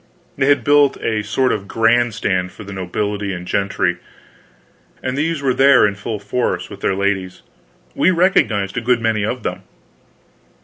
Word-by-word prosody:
They 135 -1 +1
had 145 0 +3
built 145 -1 +4
a 110 -2 -1
sort 125 +5 0
of 100 -1 -4
grand 115 +1 +2
stand 90 -1 -1
for 105 - -11
the 100 0 -9
nobility 100 +2 -3
and 90 -1 -7
gentry, 90 -2 0 1.1
and 130 0 -2
these 155 0 -1
were 130 -2 +2
there 135 -1 +5
in 100 - +1
full 105 +2 -5
force, 110 +5 -2
with - - -9
their 95 - 0
ladies. 95 -2 -2 0.5
We 170 - +3
recognized 165 - +1
a - - 0
good 120 +1 +2
many 110 -2 0
of 125 +4 -3
them. - - -4
110 Hz, 170 wpm, -18 LUFS, 100-130 Hz, 1.1 s, there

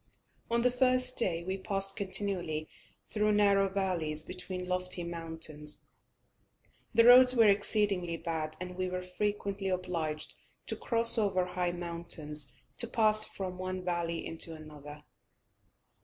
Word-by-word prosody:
On 235 0 0
the 250 - +2
first 255 0 +1
day 170 -7 -1
we 190 +2 -5
passed 195 0 +2
continually 185 -6 -2 0.4
through 210 0 -1
narrow 200 -1 +2
valleys 175 -6 -2
between 180 +1 -7
lofty 180 -1 -1
mountains. 160 -3 -4 1.1
The 230 0 +3
roads 250 +1 +7
were 225 -2 +4
exceedingly 200 -4 0
bad, 160 -2 -5
and 180 0 -8
we 185 0 -3
were 180 0 -5
frequently 200 +1 -4
obliged 170 -4 -4 0.3
to - - -5
cross 230 -1 +4
over 190 -4 0
high 180 -1 -3
mountains 170 -5 0 0.3
to 235 - +2
pass 215 -1 +7
from 185 -2 -7
one 185 0 -6
valley 170 -2 -3
into 165 0 0
another. 150 -1 -13
185 Hz, 130 wpm, -29 LUFS, 165-205 Hz, 1.1 s, roads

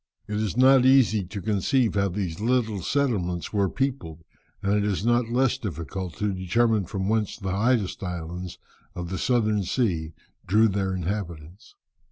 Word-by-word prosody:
It 105 -1 -3
is 110 +1 -2
not 130 0 +6
easy 130 -6 +4
to 100 +2 -7
conceive 110 +4 +1
how 100 -1 +1
these 90 -3 -4
little 110 -3 0
settlements 95 - -1
were 100 -2 +2
peopled, 125 - -3 0.4
and 100 +1 +1
it 105 0 +2
is 105 0 -1
not 120 0 +2
less 130 +1 +1
difficult 90 - -5
to 105 -1 -1
determine 105 +3 +1
from 95 +1 -3
whence 110 -1 0
the 95 -3 -4
highest 110 0 +1
islands 90 -1 -5 0.4
of 90 -1 -5
the 95 - -3
Southern 110 -4 +1
Sea 85 -6 -1 0.3
drew 110 +5 +5
their 95 -1 -1
inhabitants." 90 -2 -5
100 Hz, 160 wpm, -25 LUFS, 90-115 Hz, 0.4 s, not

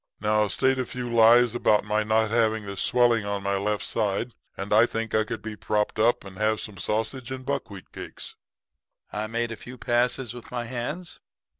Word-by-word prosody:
Now 105 0 +2
state 130 +5 +1
a 130 - 0
few 125 -2 -5
lies 115 +1 +6
about 110 -3 +3
my 105 +1 0
not 110 0 +2
having 110 -2 +2
this 100 -1 -4
swelling 120 -3 +3
in 100 -1 -3
my 100 0 0
left 105 +1 -1
side, 110 +2 -1 0.2
and 100 +2 -2
I 110 +3 +6
think 115 -1 -4
I 110 - +3
could 110 - -6
be 110 -1 -5
propped 105 +1 -1
up 115 -1 +3
and 95 -1 -10
have 110 0 +2
some 100 -3 -7
sausage 115 +5 -2
and 130 -1 -6
buckwheat 115 -9 -4
cakes.' - - -8 0.8
"I 105 +1 -2
made 115 +1 -2
a - - -4
few 125 +3 -11
passes 120 0 0
with 120 -1 -10
my 120 -1 -3
hands. 130 +9 -5
110 Hz, 195 wpm, -26 LUFS, 105-120 Hz, 0.8 s, lies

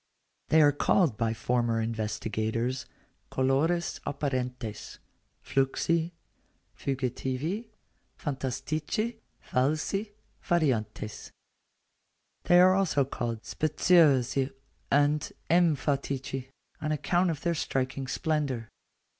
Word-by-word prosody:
They 155 0 +6
are 145 - +6
called 145 - +2
by 115 0 0
former 120 -1 +1
investigators 110 +2 -2 0.4
colores 150 +7 +1
apparentes, 125 -6 -3 0.5
fluxi, 160 +5 +1 0.6
fugitivi, 135 - -2 0.5
phantastici, 155 - -2 0.3
falsi, 155 +10 0 0.3
variantes. 115 - -1 1.2
They 175 - +6
are 185 +1 +7
also 175 -8 +2
called 115 -4 -4
speciosi 140 -5 +3 0.4
and 145 +1 +2 0.2
emphatici, 140 -5 +1 0.3
on 155 - -1
account 175 +4 +1
of 160 -3 -3
their 170 -1 +1
striking 135 -3 -2
splendour. 140 -6 -1
140 Hz, 80 wpm, -29 LUFS, 125-160 Hz, 1.2 s, are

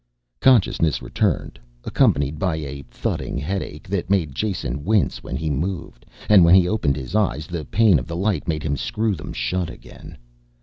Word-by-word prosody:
Consciousness 95 - +3
returned, - - -1 0.2
accompanied 70 +2 +1
by 90 -3 0
a 70 -3 -6
thudding - - -3
headache 75 0 -4
that 95 -2 -2
made 90 -8 +1
Jason 70 - -3
wince 105 +2 +1
when - - -6
he 80 -1 -2
moved, 75 -4 -4 0.2
and 100 -4 +7
when 85 +2 +7
he 90 -2 +5
opened 85 -10 +1
his 65 +4 -7
eyes 80 - +1
the 85 -2 -5
pain 105 -5 +4
of 60 - -8
the 85 - -5
light 95 -4 -1
made 75 -2 -2
him 70 -2 -1
screw 110 - -1
them 75 -6 -7
shut 90 -2 -2
again. - - -12
85 Hz, 175 wpm, -22 LUFS, 75-95 Hz, 0.2 s, and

